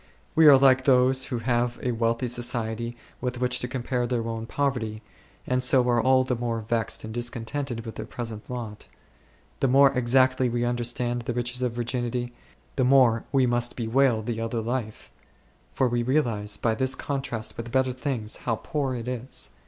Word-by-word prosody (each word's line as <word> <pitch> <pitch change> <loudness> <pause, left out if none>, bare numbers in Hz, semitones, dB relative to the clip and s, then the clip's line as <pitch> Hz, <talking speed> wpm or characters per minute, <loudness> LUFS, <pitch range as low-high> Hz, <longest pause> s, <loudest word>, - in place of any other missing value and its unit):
We 160 -1 +6
are 140 -2 +9
like 130 -1 +4
those 130 0 +4
who 130 -3 -3
have 120 0 0
a 125 - 0
wealthy 115 +1 0
society 120 -1 -2 0.2
with 125 -1 -3
which 125 0 +1
to 125 - -2
compare 125 -1 -2
their 115 -2 -1
own 115 0 -4
poverty, 115 -7 -2 0.4
and 125 0 0
so 125 0 +4
are 120 -1 +3
all 130 0 +4
the 130 -1 -1
more 115 -1 -2
vexed 115 0 -2
and 110 0 -7
discontented 120 +1 -4
with 115 - -8
their - - -6
present 115 -3 -7
lot. 115 -4 -6 0.7
The 135 - +2
more 135 +1 +6
exactly 130 +1 +3
we 120 0 -1
understand 120 0 -1
the 120 0 -4
riches 125 +1 -2
of 125 -2 0
virginity, 120 0 -3 0.4
the 130 - +3
more 125 -3 +4
we 135 -2 +3
must 120 0 0
bewail 120 -1 +2
the 115 0 -3
other 115 +1 -2
life; 115 -1 -4 0.6
for 130 - +2
we 120 0 0
realize 115 -6 0
by 115 +1 +1
this 130 +4 0
contrast 135 -6 -4
with 115 0 -7
better 130 0 +1
things, 125 -4 -3
how 115 - -1
poor 135 +1 -3
it 120 0 -6
is. 125 +1 -3
120 Hz, 180 wpm, -26 LUFS, 115-130 Hz, 0.7 s, are